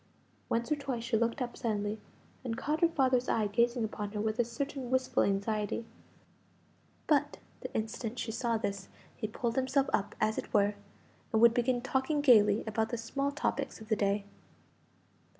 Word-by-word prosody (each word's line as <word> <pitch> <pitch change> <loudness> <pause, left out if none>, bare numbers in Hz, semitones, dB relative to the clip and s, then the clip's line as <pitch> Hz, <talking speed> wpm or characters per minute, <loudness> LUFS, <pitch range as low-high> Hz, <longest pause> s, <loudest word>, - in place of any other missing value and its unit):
Once 235 +5 -1
or - - +4
twice 275 -5 -4
she 235 0 0
looked 235 +3 +1
up 240 - -6
suddenly, 210 -2 -2 0.4
and 230 -3 -3
caught 305 +2 -1
her 340 - +7
father's 260 -5 +2
eye 220 - +2
gazing 235 +3 +1
upon 210 -1 -4
her 210 - -3
with 215 +2 -1
a - - +5
certain 255 +2 -4
wistful 260 0 +2
anxiety; 210 +2 0 1.2
but 295 -3 +2 0.2
the - - -7
instant 225 +2 -3
she 230 - -3
saw 230 0 0
this 200 -3 -3 0.3
he 215 - -3
pulled 230 +2 -2
himself 265 +1 +2
up, 200 - 0
as 215 0 +1
it - - -7
were, 205 0 +4 0.6
and 220 - +3
would 235 0 +7
begin 245 0 +1
talking 265 +3 0
gaily 215 -7 +5
about 220 0 -1
the 240 - -2
small 275 +5 -2
topics 280 -1 -2
of 220 0 -12
the 215 - +3
day. 200 0 0
230 Hz, 175 wpm, -31 LUFS, 215-260 Hz, 1.2 s, her